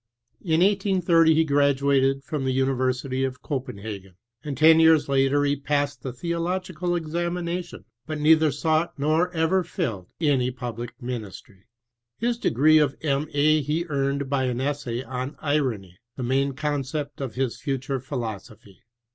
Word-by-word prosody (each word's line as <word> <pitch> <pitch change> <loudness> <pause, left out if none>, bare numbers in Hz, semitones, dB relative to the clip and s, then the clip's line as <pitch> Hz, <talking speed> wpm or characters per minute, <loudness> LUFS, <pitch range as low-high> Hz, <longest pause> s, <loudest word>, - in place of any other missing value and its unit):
In 160 -2 +1
1880 180 -5 +3
he 160 - +4
graduated 140 -2 +2
from 145 0 -3
the 130 - 0
University 130 0 0
of 130 -1 -4
Copenhagen, 105 -8 -6 0.3
and 145 -3 -5
10 160 +1 +7
vears 160 -2 +5
later 140 +1 +2
he 145 0 +2
passed 145 -1 -1
the 130 - -4
theological 175 +4 -2
examination, 170 +1 -3 0.2
but 155 -1 -4
neither 155 0 +5
sought 160 +3 0
nor 155 +5 +1
ever 175 +2 +1
fiUed 115 - -4
any 140 -6 +2
public 120 -1 -6
nunistry. 105 -5 -7 0.5
His 235 +1 -1
de - - +1
gree 155 +6 +5
of 145 -3 +1
M. 145 0 0
A. 155 +1 +4
he 155 +4 -1
earned 140 -1 -1
by 135 -1 0
an 125 -1 -2
essay 130 -3 -2
On 130 +2 -5
Irony, 125 - -2 0.2
the 130 - -5
main 135 +3 +1
concept 145 0 -3
of 125 -5 -5
his 130 -2 -2
future 135 -1 -2
philosophy. 110 -6 -7
140 Hz, 145 wpm, -25 LUFS, 130-160 Hz, 0.5 s, 10